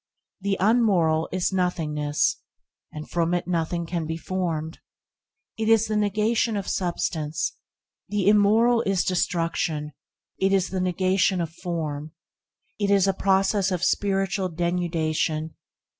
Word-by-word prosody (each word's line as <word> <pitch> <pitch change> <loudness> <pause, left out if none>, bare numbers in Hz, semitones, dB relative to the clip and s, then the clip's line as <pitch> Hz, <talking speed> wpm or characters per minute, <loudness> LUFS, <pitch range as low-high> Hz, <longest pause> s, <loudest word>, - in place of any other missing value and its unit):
The 195 0 -1
unmoral 190 -7 +3
is 185 +1 0
nothingness, 165 +1 0 0.5
and 150 0 -8
from 170 0 0
it 175 - -2
nothing 170 0 -1
can 165 -1 -3
be 160 0 -3
formed. 165 -3 -3 0.8
It 220 0 0
is 225 -1 +5
the 215 - -2
negation 210 +2 +1
of 200 - -4
substance. 165 -4 -2 0.6
The 205 -2 0
immoral 220 +3 +4
is 195 -5 +1
destruction. 165 -4 -1 0.5
It 195 +1 +2
is 190 -2 +2
the 190 -1 -2
negation 185 +1 +1
of 165 -2 -2
form. 155 -4 -4 0.7
It 200 -1 0
is 200 -1 +4
a 195 - +2
process 195 +1 +2
of 180 -3 -2
spiritual 195 -1 0
denudation. 165 -2 -1
180 Hz, 130 wpm, -25 LUFS, 165-200 Hz, 0.8 s, is